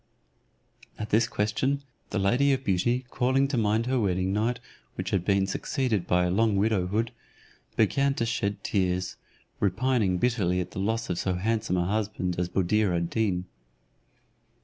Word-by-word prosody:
At 105 - -5
this 115 +2 +4
question, 120 +7 0 0.3
the - - -2
lady 120 +9 +3
of 135 0 -2
beauty 120 +6 +1
calling 130 +2 +2
to 140 - -1
mind 110 0 +1
her 130 0 +1
wedding 95 -2 0
night, 115 +4 0 0.4
which 95 0 -4
had 95 -4 +1
been 100 0 +2
succeeded 110 - -1
by 90 0 +3
a 90 - 0
long 110 +1 +2
widowhood, 105 +1 +1 0.6
began 140 0 +2
to 115 - 0
shed 105 -3 -2
tears, 90 -2 0 0.4
repining 105 -2 +1
bitterly 95 -5 +1
at 90 0 -4
the - - -6
loss 115 +2 -1
of 85 - -2
so 95 -2 0
handsome 105 0 0
a 90 - +1
husband 100 -3 -1
as 90 -1 -1
Buddir 95 +1 +1
ad 85 0 -2
Deen. 95 -5 0
105 Hz, 160 wpm, -27 LUFS, 90-115 Hz, 0.6 s, this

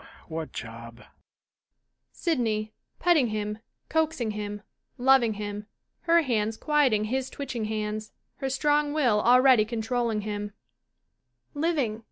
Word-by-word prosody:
"] - - -24
What 160 -1 -4
job? 115 +1 -9 1.1
SYDNEY 220 - -1 0.3
^Petting 330 -8 +4
him, 210 0 -3 0.3
coaxing 315 -8 0
him, 205 0 -5 0.3
loving 250 -3 +4
him, 205 0 -5 0.4
her 335 0 +6
hands 220 -4 0
quiet 295 -4 +3
ing 210 0 +2
his 260 +4 -2
twitching 250 -6 -4
hands, 215 0 -3 0.3
her 270 - -2
strong 295 +2 +1
will 245 -9 +3
already 250 -1 +6
con 225 +1 -4
trolling 235 -2 -1
him,] 205 0 -4 1.0
Living. 290 -8 0
225 Hz, 125 wpm, -27 LUFS, 210-270 Hz, 1.1 s, her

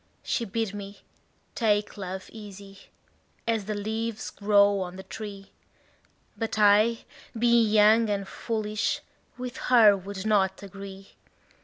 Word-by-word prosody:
She 235 - -1
bid 220 0 -2
me 200 -1 -8 0.5
take 210 -2 +1
love 190 -2 -6
easy, 200 -2 -11 0.7
as 225 -3 0
the 215 +1 -3
leaves 220 +2 -3
grow 205 -1 +3
on 180 -1 -5
the 190 - -8
tree; 200 -2 -8 0.8
But 225 -1 -3
I, 215 +2 +4 0.3
being 235 -1 +4
young 215 +1 +5
and 200 -1 -2
foolish, 215 -2 -2 0.4
with 250 0 -6
her 225 -5 +7
would 195 +1 -7
not 195 -3 +1
agree. 195 0 -10
205 Hz, 125 wpm, -27 LUFS, 195-220 Hz, 0.8 s, her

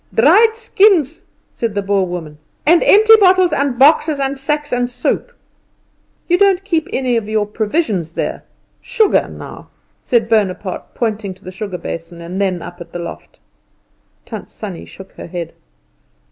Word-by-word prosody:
"Dried 400 - +5
skins," 380 - +2 0.3
said 230 -3 -3
the 200 - -1
Boer 195 -1 +1
woman, 160 -4 -7 0.3
"and 335 +2 +5
empty 435 +2 +6
bottles, 370 -3 +4
and 280 -3 0
boxes, 295 +2 +4
and 270 0 -2
sacks, 295 0 -2
and 245 0 0
soap." 245 - -2 1.0
"You 355 0 +2
don't 390 -2 +3
keep 330 -6 -1
any 250 -3 0
of 215 -2 -4
your 215 -1 +1
provisions 210 - -2
there - - -3 0.4
sugar, 445 -5 +2
now?" - - -10 0.3
said 235 -3 +1
Bonaparte, 205 -4 -1
pointing 210 -4 -2
to - - -25
the 185 - -8
sugar 190 -1 -5
basin 170 0 -7
and 175 +3 -5
then 185 -3 -1
up 175 0 -10
at 170 0 -11
the - - -4
loft. 170 - -8 0.9
Tant - - -8
Sannie 195 -6 -8
shook 190 0 -13
her - - -10
head. 170 -1 -6
230 Hz, 160 wpm, -17 LUFS, -, 1.0 s, empty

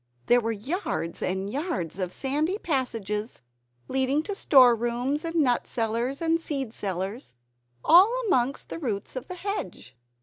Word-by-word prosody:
There 245 0 +5
were 225 0 -1
yards 220 - -3
and 190 +1 -1
yards 200 - -3
of 180 -2 -2
sandy 300 - -1
passages, 225 - -3 0.4
leading 265 +3 +1
to 405 - -4
store 260 -10 +6
rooms 240 +5 -1
and 330 0 -4
nut 260 -7 +2
cellars 235 +6 -1
and 330 0 +2
seed 275 -7 -3
cellars, 190 - -4 0.5
all 370 +6 +8
amongst 265 - 0
the - - -5
roots 220 - -3
of 255 - -5
the 365 - -6
hedge. 370 - -5
255 Hz, 145 wpm, -26 LUFS, 215-310 Hz, 0.5 s, all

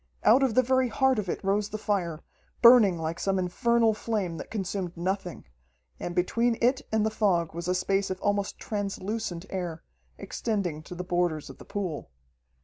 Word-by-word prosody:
Out 250 +5 +6
of 260 -5 +2
the 255 - +5
very 260 +1 +2
heart 265 +1 +2
of 195 -3 -4
it - - -3
rose 200 +2 +1
the 215 - -4
fire, 175 -7 -2 0.4
burning 235 -7 +8
like 160 +1 -3
some 195 -1 0
infernal 225 +5 +2
flame 205 -6 -2
that - - -8
consumed 190 -4 -3
nothing, 185 +1 -3 0.5
and 175 - -5
between 230 +6 +1
it 255 +3 +2
and 215 -1 +2
the 220 - 0
fog 180 -7 +1
was 170 +1 -5
a 180 - +1
space 195 +2 0
of 185 0 -3
almost 205 0 -1
translucent 205 -2 -4
air, 175 -4 -4 0.3
extending 195 -9 -3
to 180 - -9
the 180 - -4
borders 175 -4 -1
of - - -16
the - - -12
pool. 180 - -4
195 Hz, 180 wpm, -27 LUFS, 175-220 Hz, 0.5 s, burning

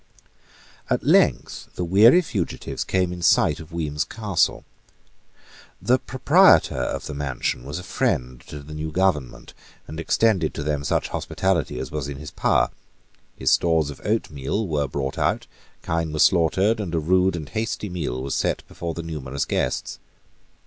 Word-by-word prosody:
At - - 0
length - - +2
the 90 - -2
weary 110 - +6
fugitives 100 - -3
came 90 -2 0
in 90 - -8
sight - - +3
of 80 +1 -11
Weems 75 -3 -2
Castle. 105 -6 -1 1.1
The 125 +6 +2
proprietor 145 - +4
of 65 -1 -3
the 75 - -5
mansion 70 -4 -2
was 70 +4 -5
a 90 - -7
friend 65 -8 -1
to 75 -1 -8
the 75 +2 -10
new 80 +1 -4
government, 75 -8 -1 0.3
and 80 +2 -7
extended 95 -2 +1
to 75 - -3
them 75 -1 -1
such - - 0
hospitality 95 -7 -1
as - - -5
was 75 -2 -3
in 70 -1 -6
his 75 +1 -9
power. - - +1 0.6
His 65 - +1
stores 80 -4 +2
of 70 - -12
oatmeal 100 -2 -2
were 75 -3 0
brought 65 0 -4
out, - - 0 0.4
kine 80 -1 -1
were 75 - -4
slaughtered; 95 +7 +3
and 90 -5 -3
a - - +2
rude 90 +3 +2
and 80 -3 -6
hasty 110 -1 -3
meal 75 -9 -4
was 70 - -3
set - - -1
before 85 -2 -5
the 85 - -5
numerous 70 -4 -4
guests. - - -2
80 Hz, 165 wpm, -23 LUFS, 75-95 Hz, 1.1 s, weary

